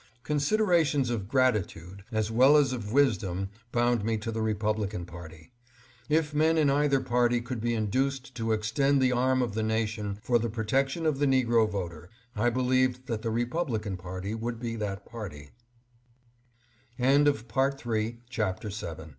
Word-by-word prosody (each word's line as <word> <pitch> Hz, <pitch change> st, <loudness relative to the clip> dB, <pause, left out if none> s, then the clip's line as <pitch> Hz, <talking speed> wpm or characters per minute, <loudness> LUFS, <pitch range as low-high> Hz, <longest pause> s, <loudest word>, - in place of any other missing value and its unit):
Considerations 150 Hz, -, +2 dB
of 105 Hz, -5 st, -3 dB
gratitude 100 Hz, -7 st, 0 dB
as 110 Hz, -1 st, -1 dB
well 130 Hz, +6 st, +6 dB
as 140 Hz, -3 st, +3 dB
of 105 Hz, -4 st, -5 dB
wisdom 95 Hz, -8 st, +1 dB, 0.2 s
bound 120 Hz, -2 st, +2 dB
me 110 Hz, +1 st, 0 dB
to 115 Hz, +2 st, -4 dB
the 110 Hz, -, -3 dB
Republi 110 Hz, -1 st, 0 dB
can 90 Hz, -4 st, -5 dB
party. 85 Hz, +1 st, -12 dB, 0.6 s
If 155 Hz, -1 st, +1 dB
men 160 Hz, +2 st, +3 dB
in 150 Hz, -3 st, +4 dB
either 140 Hz, -1 st, +3 dB
party 120 Hz, -1 st, +2 dB
could 120 Hz, -1 st, -5 dB
be 120 Hz, 0 st, 0 dB
induced 130 Hz, +5 st, -1 dB
to 115 Hz, -2 st, -2 dB
extend 115 Hz, +6 st, +2 dB
the 130 Hz, -1 st, +3 dB
arm 130 Hz, +1 st, +2 dB
of 115 Hz, -4 st, -3 dB
the 110 Hz, -, -1 dB
nation 110 Hz, -2 st, -1 dB
for 120 Hz, +1 st, +2 dB
the 115 Hz, +1 st, -2 dB
protection 135 Hz, +8 st, -1 dB
of 150 Hz, -3 st, +1 dB
the 145 Hz, -, +2 dB
negro 120 Hz, -4 st, +3 dB
voter 90 Hz, -4 st, -5 dB, 0.3 s
I 115 Hz, +3 st, +2 dB
believed 130 Hz, +1 st, +1 dB
that 115 Hz, -3 st, -3 dB
the 115 Hz, -, -2 dB
Republican 120 Hz, -, -2 dB
party 95 Hz, +3 st, -5 dB
would 115 Hz, +1 st, -4 dB
be 115 Hz, -1 st, -4 dB
120 Hz, 140 wpm, -28 LUFS, 105-135 Hz, 0.6 s, well